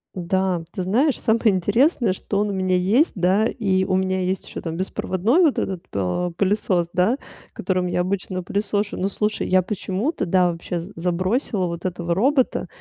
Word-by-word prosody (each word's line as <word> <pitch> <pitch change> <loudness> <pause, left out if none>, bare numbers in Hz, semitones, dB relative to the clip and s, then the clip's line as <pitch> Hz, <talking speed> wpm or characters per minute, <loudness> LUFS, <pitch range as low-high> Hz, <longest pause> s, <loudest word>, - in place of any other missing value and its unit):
Да, 185 -1 0
ты 185 -4 -4
знаешь, 250 +10 +2
самое 225 -1 +2
интересное, 220 - +2
что 200 +1 -3
он 210 0 +1
у - - -2
меня 185 -1 +1
есть. 215 - +3
Да, 190 +3 +2
и 195 -6 0
у 190 0 +1
меня 190 0 0
есть 185 +1 -2
ещё - - -7
там 165 -1 -4
беспроводной 190 - +1
вот 315 -6 +3
этот, 185 -2 -3
э, 100 - -1
пылесос, 190 -3 +1
да, 200 +8 +2 0.3
которым 185 -1 -1
я 180 - -1
обычно 185 0 -2
пылесошу. 205 +2 -2
Ну, 195 +2 -1
слушай, 210 +2 -1
я 185 0 +4
почему-то, 200 - -2
да, 180 0 +3
вообще 170 +1 -4
з 175 +5 -9
забросила 185 +4 0
вот 170 -1 -5
этого 175 -1 -1
робота, 260 +6 +1
190 Hz, 180 wpm, -22 LUFS, 180-210 Hz, 0.3 s, я